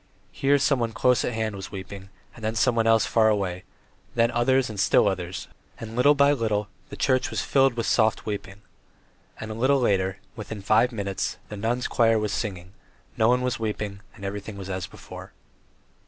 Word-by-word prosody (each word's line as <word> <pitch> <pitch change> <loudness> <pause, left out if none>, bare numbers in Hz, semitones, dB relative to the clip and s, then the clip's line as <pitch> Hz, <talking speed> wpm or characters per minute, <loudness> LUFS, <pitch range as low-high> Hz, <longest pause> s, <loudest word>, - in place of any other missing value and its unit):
Here 140 +1 +2
someone 125 -5 +1
close 125 +2 +2
at 125 - -2
hand 110 -2 -2
was 95 0 -8
weeping, 95 0 -8 0.3
then 110 -1 -3
someone 115 0 +2
else 115 0 +4
farther 110 -1 +3
away, 95 -4 -1 0.5
then 115 0 +3
others 130 +2 +2
and 110 -3 -7
still 100 - +4
others, 95 -2 -3 0.3
and 115 0 -7
little 140 +4 +5
by 140 0 +5
little 110 -6 -1 0.2
the - - -7
church 130 -1 +1
was - - -2
filled 135 -2 +3
with 115 -2 -2
soft 110 -1 +2
weeping. 100 -1 -6 0.8
And 110 - -6
a - - -3
little 130 +5 +2
later, 95 -5 +1 0.2
within 110 -2 -7
five 115 +5 +3
minutes, 100 -4 -3
the 105 - -6
nuns' 115 +4 -1
choir 115 -1 +3
was 105 -2 -1
singing; 95 -4 -4 0.4
no 110 - +3
one 125 +1 +3
was 125 -1 -1
weeping 105 -2 -4
and 100 - -9
everything 100 +1 -5
was 95 -1 -6
as 95 -1 -3
before. - - -11
110 Hz, 185 wpm, -25 LUFS, 100-120 Hz, 0.8 s, little